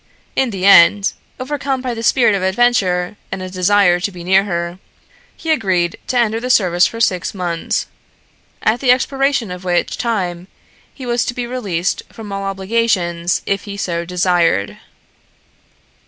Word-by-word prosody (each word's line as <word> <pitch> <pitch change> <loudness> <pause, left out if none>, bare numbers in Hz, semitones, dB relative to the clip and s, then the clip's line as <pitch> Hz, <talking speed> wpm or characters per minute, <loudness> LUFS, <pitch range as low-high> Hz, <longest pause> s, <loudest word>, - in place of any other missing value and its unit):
In 265 -2 +1
the 195 -3 -3
end, 195 +1 +6 0.3
overcome 275 0 -2
by 255 -1 -3
the 225 - -5
spirit 235 -1 +3
of 195 - -1
adventure 190 -2 +1
and 195 -1 -4
a 185 - -7
desire 185 -1 +3
to 200 +3 -2
be 175 -2 -10
near 190 +2 +3
her, 170 -1 -3 0.6
he 325 - -2
agreed 185 - +1
to 255 - -1
enter 225 -2 +1
the 250 +2 -5
service 180 -7 +4
for 230 - -8
six 185 -4 0
months, 175 -3 -2 0.8
at 220 +3 +2
the 260 - -1
expiration 270 -3 +1
of 180 0 -7
which 175 -1 -1
time 185 -6 -2 0.4
he 260 - -10
was 240 0 0
to 245 - -3
be 245 -2 -3
released 195 -9 -2
from 215 -3 -9
all 195 0 -4
obligations 190 -4 0
if 195 -1 -2
he 200 -1 -7
so 170 -3 -2
desired. 170 - +1
195 Hz, 160 wpm, -17 LUFS, 180-235 Hz, 0.8 s, end